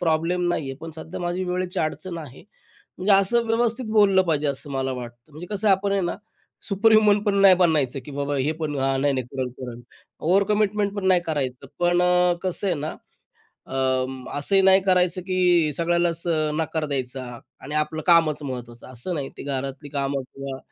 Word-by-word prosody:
Problem 170 +2 +1
नाहीये, 135 -6 -2
पण 165 0 -7
सध्या 160 +3 -7
माझी 175 +1 -2
वेळेची 180 0 -2
अडचण 170 +2 -3
आहे." 140 -5 -10 0.6
म्हणजे 195 +2 +2
असं 230 +4 +3
व्यवस्थित 230 +2 0
बोललं 195 -3 +5
पाहिजे 155 -4 0
असं 140 +1 -3
मला 135 -1 -1
वाटतं. 120 +2 -9
म्हणजे 165 +4 -9
कसं 205 +1 +1
आपण 195 +1 +2
आहे 200 - +1
ना, 175 -2 -2 0.5
सुपर 220 +2 +2
ह्युमन 210 -1 +5
पण 205 -2 +1
नाही 195 -2 +8
बनायचं, 155 -7 +2
की 150 - -9
बाबा 145 0 -1
हे 140 +3 0
पण 150 -2 -2
हां, 135 0 +1
नाही-नाही 135 -3 0
करेल-करेल. 125 -2 -6 0.4
ओव्हरकमिटमेंट 205 +3 +1
पण 190 -2 -2
नाही 185 -2 +4
करायचं. 135 -4 -3
पण 175 0 +2
अ, 180 0 +3
कसं 185 +2 -1
आहे 180 - +2
ना, 150 +2 -4 0.7
अं, 130 -1 -1
असंही 195 +7 +3
नाही 190 0 +6
करायचं 185 -1 +2
की 180 -4 +2
सगळ्यालाच 170 0 0
अ, 155 -2 +1
नकार 160 0 -2
द्यायचा 130 -2 -3 0.4
आणि 150 +3 -7
आपलं 155 +1 -1
कामच 165 -3 +4
महत्त्वाचं 120 -4 -7
असं 130 +9 -4
नाही. 140 -4 -3
ती - - -8
घरातली 140 +1 -4
कामं 140 -1 -2
किंवा 135 -1 -6
165 Hz, 175 wpm, -24 LUFS, 135-185 Hz, 0.7 s, नाही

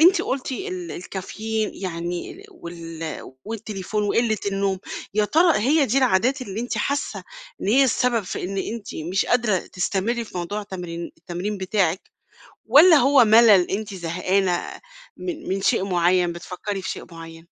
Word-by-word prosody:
أنتِ 360 +4 +6
قلتِ 265 0 -3
ال 370 +3 -5
الكافيين 215 +4 -4
يعني 175 -1 -4
ال 390 - -14
وال 165 - -8
والتليفون 210 -2 -4
وقلة 220 +1 +1
النوم 195 -1 0 0.4
يا 210 0 +3
ترى 330 +8 +4
هي 280 +6 +3
دي 260 +4 +2
العادات 255 +2 +2
اللي 205 -2 -5
أنتِ 245 - -3
حاسة 280 +1 -2 0.4
إن - - -2
هي 270 +6 +5
السبب 245 -2 +1
في 185 - -5
إن 195 +2 -3
أنتِ 220 +2 -5
مش 175 +5 -1
قادرة 230 -6 +2
تستمري 200 +7 -2
في 200 - -7
موضوع 205 +5 -3
تمرين 175 -3 -6
التمرين 190 +4 -4
بتاعِك، 190 -2 0 0.6
والّا 325 +3 +8
هو 275 -1 +6
ملل 215 -4 +6
أنتِ 205 0 -3
زهقانة 180 +1 -1 0.4
من 330 -3 -6
من 195 +1 -1
شيء 195 - +2
معين 180 -1 +2
بتفكّري 185 +3 -5
في - - -3
شيء - - -6
معين؟ 165 0 -11
200 Hz, 155 wpm, -23 LUFS, 180-240 Hz, 0.6 s, والّا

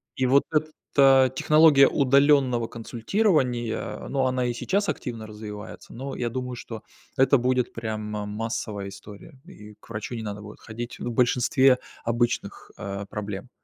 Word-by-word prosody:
И 130 - 0
вот 135 +2 +4
эта 135 -4 +3
технология 150 -3 +6
удаленного 140 -3 +3
консультирования, 120 - -1
ну, 135 -1 0
она 130 -1 +1
и 120 - -1
сейчас 200 - -1
активно 115 -4 -5
развивается, 105 -1 -9
но 135 +3 -6
я 120 -1 -2
думаю, 125 -1 -4
что 115 -2 -8 0.4
это 135 +1 +5
будет 125 0 0
прямо 110 -2 -4
массовая 105 -2 -4
история, 105 +6 -13
и 105 0 -13
к - - -21
врачу 110 +2 -5
не 110 - -5
надо 105 -1 -5
будет 105 0 -11
ходить, 120 +2 -7
ну, 120 - -3
в - - -6
большинстве 125 +2 +3 0.3
обычных, 120 +1 -1
э, 100 -1 -5
проблем. 105 +3 -6
120 Hz, 150 wpm, -25 LUFS, 110-135 Hz, 0.4 s, технология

